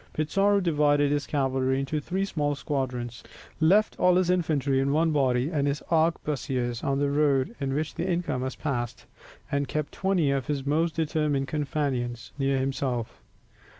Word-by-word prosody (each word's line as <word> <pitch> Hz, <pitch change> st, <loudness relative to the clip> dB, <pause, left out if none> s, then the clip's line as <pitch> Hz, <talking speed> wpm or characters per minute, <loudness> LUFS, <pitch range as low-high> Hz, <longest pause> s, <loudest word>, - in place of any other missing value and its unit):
Pizarro 195 Hz, +6 st, +2 dB
divided 145 Hz, -5 st, +2 dB
his 145 Hz, -4 st, -1 dB
cavalry 130 Hz, -1 st, 0 dB
into 135 Hz, +3 st, -2 dB
three 185 Hz, +6 st, -2 dB
small 145 Hz, -6 st, -1 dB
squadrons, 125 Hz, -4 st, -3 dB, 0.4 s
left 195 Hz, +7 st, +4 dB
all 180 Hz, 0 st, +5 dB
his 180 Hz, -1 st, +3 dB
infantry 145 Hz, -6 st, +1 dB
in 135 Hz, +1 st, +1 dB
one 160 Hz, +2 st, +2 dB
body, 135 Hz, -1 st, +1 dB
hid 145 Hz, -4 st, 0 dB
his 145 Hz, +1 st, -2 dB
arquebusiers 140 Hz, -7 st, 0 dB
on 140 Hz, 0 st, 0 dB
the 140 Hz, 0 st, +1 dB
road 145 Hz, -, +2 dB
by 140 Hz, -, -2 dB
which 145 Hz, +3 st, -2 dB
the 175 Hz, +3 st, -3 dB
inca 170 Hz, -7 st, -1 dB
must 130 Hz, +1 st, -4 dB
pass, 120 Hz, -6 st, -3 dB, 0.5 s
and 140 Hz, 0 st, 0 dB
kept 150 Hz, -1 st, -3 dB
twenty 185 Hz, -7 st, +1 dB
of 135 Hz, -3 st, -1 dB
his 140 Hz, -2 st, -2 dB
most 160 Hz, +3 st, +1 dB
determined 150 Hz, -4 st, 0 dB
companions 135 Hz, -5 st, -2 dB
near 135 Hz, 0 st, +1 dB
himself. 130 Hz, -3 st, -2 dB
145 Hz, 160 wpm, -27 LUFS, 135-160 Hz, 0.5 s, all